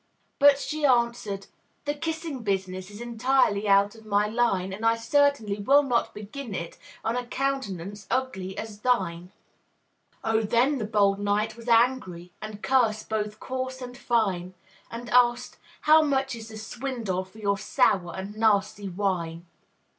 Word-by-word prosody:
But 285 Hz, -1 st, +7 dB
she 305 Hz, +2 st, -4 dB
answered, 235 Hz, -6 st, +1 dB, 0.4 s
"The 290 Hz, -, 0 dB
kissing 320 Hz, -2 st, -4 dB
business 190 Hz, -2 st, -2 dB
Is 205 Hz, +2 st, -10 dB
entirely 240 Hz, -3 st, +1 dB
out 200 Hz, 0 st, +4 dB
of 225 Hz, -1 st, -15 dB
my 205 Hz, -1 st, +2 dB
line; 210 Hz, -4 st, 0 dB
And 210 Hz, +4 st, -7 dB
I 225 Hz, 0 st, +4 dB
certainly 230 Hz, -3 st, +1 dB
will 280 Hz, +8 st, +5 dB
not 245 Hz, -4 st, 0 dB
begin 215 Hz, +2 st, -7 dB
it 170 Hz, -1 st, -6 dB, 0.3 s
On 225 Hz, -, 0 dB
a 245 Hz, -1 st, -3 dB
countenance 210 Hz, -8 st, -3 dB
ugly 190 Hz, -8 st, -2 dB
as 215 Hz, -2 st, -6 dB
thine!" 185 Hz, -7 st, 0 dB, 0.9 s
Oh, 225 Hz, 0 st, +2 dB
then 245 Hz, +6 st, +2 dB
the 220 Hz, -, -2 dB
bold 200 Hz, -2 st, +2 dB
knight 205 Hz, +2 st, 0 dB
was 230 Hz, 0 st, -12 dB
angry, 230 Hz, -8 st, +2 dB
And 215 Hz, -1 st, -8 dB
cursed 230 Hz, -5 st, +2 dB
both 210 Hz, -1 st, -2 dB
coarse 260 Hz, 0 st, -4 dB
and 250 Hz, -1 st, -8 dB
fine; 195 Hz, -7 st, 0 dB, 0.3 s
And 235 Hz, +1 st, -7 dB
asked, 245 Hz, 0 st, +3 dB, 0.2 s
"How 310 Hz, +1 st, +6 dB
much 270 Hz, -3 st, 0 dB
is 225 Hz, -1 st, -9 dB
the 220 Hz, -, -9 dB
swindle 225 Hz, -4 st, -3 dB
For 190 Hz, +3 st, -18 dB
your 200 Hz, -2 st, 0 dB
sour 190 Hz, -7 st, +1 dB
and 195 Hz, +2 st, -6 dB
nasty 205 Hz, -2 st, +1 dB
wine?" 175 Hz, -3 st, -2 dB
220 Hz, 155 wpm, -26 LUFS, 200-250 Hz, 0.9 s, But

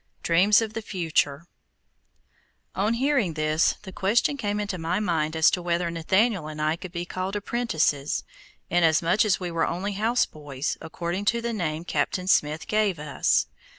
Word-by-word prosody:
DREAMS 195 Hz, +6 st, +4 dB
OF 220 Hz, -1 st, -5 dB
THE 225 Hz, -, -4 dB
FUTURE 165 Hz, -6 st, -1 dB, 1.3 s
On 210 Hz, +4 st, +1 dB
hearing 255 Hz, -, +1 dB
this, 155 Hz, +1 st, +2 dB
the 190 Hz, -, -8 dB
question 215 Hz, +10 st, +1 dB
came 210 Hz, -6 st, -2 dB
into 200 Hz, -3 st, -3 dB
my 170 Hz, +4 st, -1 dB
mind 165 Hz, -6 st, 0 dB
as 160 Hz, 0 st, +5 dB
to 180 Hz, -, -1 dB
whether 175 Hz, 0 st, -1 dB
Nathaniel 190 Hz, +2 st, +1 dB
and 155 Hz, 0 st, -7 dB
I 155 Hz, +1 st, +1 dB
could 180 Hz, +1 st, -9 dB
be 175 Hz, -1 st, -4 dB
called 185 Hz, +2 st, -4 dB
apprentices, 185 Hz, -, 0 dB, 0.4 s
inasmuch 170 Hz, +3 st, +3 dB
as 205 Hz, -, +2 dB
we 180 Hz, -2 st, -4 dB
were 165 Hz, -1 st, 0 dB
only 190 Hz, +4 st, -3 dB
houseboys, 155 Hz, -, -1 dB
according 175 Hz, +4 st, -4 dB
to 235 Hz, +3 st, +2 dB
the 235 Hz, 0 st, -2 dB
name 165 Hz, -5 st, -3 dB
Captain 180 Hz, +1 st, -1 dB
Smith 155 Hz, -4 st, +2 dB
gave 210 Hz, -4 st, +1 dB
us. 150 Hz, -1 st, +1 dB
180 Hz, 160 wpm, -25 LUFS, 160-205 Hz, 1.3 s, as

